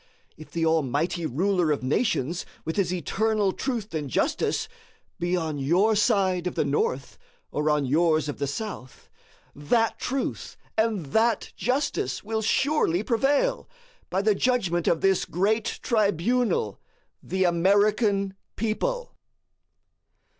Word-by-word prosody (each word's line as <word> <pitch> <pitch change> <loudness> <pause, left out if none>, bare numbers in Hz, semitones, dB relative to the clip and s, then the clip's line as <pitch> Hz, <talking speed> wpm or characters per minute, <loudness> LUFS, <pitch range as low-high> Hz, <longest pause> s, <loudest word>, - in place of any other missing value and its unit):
If 155 - -12
the 165 -1 -1
Almighty 160 +2 0
Ruler 180 +4 +1
of 145 -3 0
Nations, 160 - 0 0.2
with 160 - -3
his 195 -3 +1
eternal 200 +4 0
truth 230 -3 -4
and 150 -3 -3
justice, - - 0 0.5
be 175 +1 0
on 160 -4 -3
your 180 +11 +3
side 195 -5 +2
of 180 - -4
the - - +1
North, 140 -1 -1 0.3
or 150 +1 0
on 150 -2 +2
yours 155 +2 +2
of 145 - -5
the 140 - -1
South, 140 - -7 0.4
that 225 +11 0
truth 265 +1 -3 0.2
and 220 -6 0
that 225 -1 +1
justice 265 +4 -1
will 220 +1 -2
surely 220 - +1
prevail, 280 - +1 0.4
by 190 +2 0
the 215 0 +4
judgment 195 -7 0
of 165 - +2
this 195 -1 +3
great 210 +5 0 0.2
tribunal, 210 - +1 0.4
the 190 +1 -1
American 200 +3 +2 0.2
people. - - -2
190 Hz, 125 wpm, -26 LUFS, 160-220 Hz, 0.5 s, the